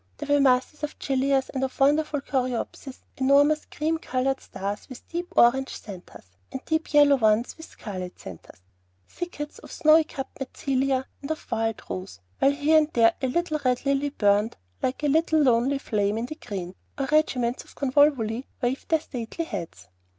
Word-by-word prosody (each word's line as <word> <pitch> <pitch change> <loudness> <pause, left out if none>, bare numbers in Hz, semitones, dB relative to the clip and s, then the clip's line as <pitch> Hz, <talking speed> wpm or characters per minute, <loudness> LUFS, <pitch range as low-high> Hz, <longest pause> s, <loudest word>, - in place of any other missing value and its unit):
There 290 - +1
were 285 - +3
masses 260 +3 +2
of 300 0 -4
gillias, 270 0 0
and 265 -1 -3
of 265 +1 -4
wonderful 295 +1 +2
coreopsis, 255 0 -3 0.2
enormous 285 +3 +4
cream 320 +2 -2
colored 265 -1 -1
stars 200 +2 -6
with 255 - -11
deep 350 +2 -4
orange 265 +3 +4
centres, 190 -4 -11 0.3
and 265 - -4
deep 320 0 -1
yellow 290 -2 +6
ones 220 0 +2
with 320 - -11
scarlet 185 -4 -7
centres; 90 0 -12 0.4
thickets 295 -4 -6
of - - -13
snowy 315 +1 +5
cupped 270 -3 -8
mentzelia 265 0 -1 0.2
and 280 - -7
of 315 - -5
wild 225 -1 -1
rose; 185 +1 -6 0.2
while 275 - +5
here 300 +2 +4
and 310 0 -1
there 230 -1 +5
a 260 - 0
tall 340 0 0
red 250 0 0
lily 275 +1 +1
burned 210 -3 +1 0.2
like 260 +4 -2
a - - +3
little 315 +2 +3
lonely 255 +2 +3
flame 210 -5 -1
in 230 - -2
the 260 - -6
green, 190 - -6 0.2
or 275 - -1
regiments 255 -6 +1
of - - -19
convolvuli 265 -4 +2
waved 255 +1 -2
their 320 -1 +3
stately 250 +4 -5
heads. 170 - -7
270 Hz, 170 wpm, -25 LUFS, 235-295 Hz, 0.4 s, yellow